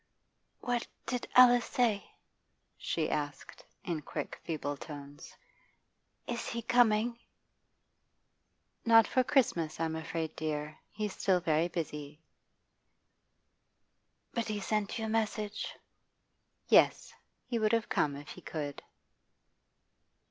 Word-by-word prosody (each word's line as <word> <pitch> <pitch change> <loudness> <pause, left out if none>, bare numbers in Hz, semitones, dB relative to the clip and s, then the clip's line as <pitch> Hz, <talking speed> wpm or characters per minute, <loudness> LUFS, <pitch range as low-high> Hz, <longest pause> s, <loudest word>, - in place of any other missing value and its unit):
'What 245 -1 -1 0.2
did 250 -1 -3
Alice 245 -1 +8
say?' 225 -5 +1 0.7
she 160 -2 -1
asked, 145 -2 -4 0.2
in 165 -3 -2
quick - - -5
feeble 145 -3 -3
tones. 145 0 -10 0.9
'Is 235 -1 -3
he 235 0 -3
coming?' 235 0 +3 1.6
'Not 225 -1 +7
for 255 - +2
Christmas, 190 - +1
I'm 160 -1 -1
afraid, 160 0 -4
dear. 150 -1 -3
He's 210 -2 -3
still 185 -2 +2
very 165 -1 +2
busy.' 150 -3 -5 2.1
'But 235 -1 -1
he 210 -1 -2
sent 210 +2 -1
you 225 - -2
a - - -2
message?' 215 -1 -1 1.0
'Yes. - - +4 0.3
He 240 -2 -1
would 215 -1 +2
have 230 -1 +2
come 145 -2 +1
if 145 +1 -9
he - - -9
could. 145 -3 -5
195 Hz, 110 wpm, -32 LUFS, 155-230 Hz, 2.1 s, Alice